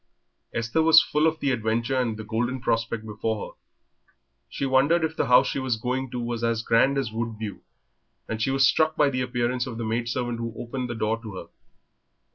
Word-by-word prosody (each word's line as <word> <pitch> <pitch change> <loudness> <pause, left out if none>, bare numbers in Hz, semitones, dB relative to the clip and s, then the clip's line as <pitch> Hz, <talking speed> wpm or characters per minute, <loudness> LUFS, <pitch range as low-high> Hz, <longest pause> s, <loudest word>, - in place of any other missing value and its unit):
Esther 115 +7 0
was 160 0 +8
full 150 0 +2
of 160 0 -1
the 140 -2 0
adventure 115 +2 0
and 120 -4 0
the 110 - -6
golden 120 +4 -2
prospect 115 -2 -1
before 110 0 -3
her. - - -29 0.9
She 140 - -3
wondered 140 +6 +3
if 160 0 -1
the - - 0
house 125 - +6
she - - -2
was 130 -3 0
going 125 +3 -2
to 125 - -4
was 120 -1 -3
as 115 -1 0
grand 135 +5 +3
as 130 -5 -1
Woodview, 110 -2 -4 0.7
and 110 0 -4
she 125 - +1
was 135 0 +4
struck 160 0 +2
by 145 -2 +3
the 130 -1 -1
appearance 125 0 -1
of 120 -3 -6
the 115 - -3
maidservant 120 +1 -2
who 115 -1 -4
opened 125 +1 -4
the 120 - -3
door 110 +1 -1
to 110 -4 -8
her. - - -7
120 Hz, 205 wpm, -25 LUFS, 115-130 Hz, 0.9 s, was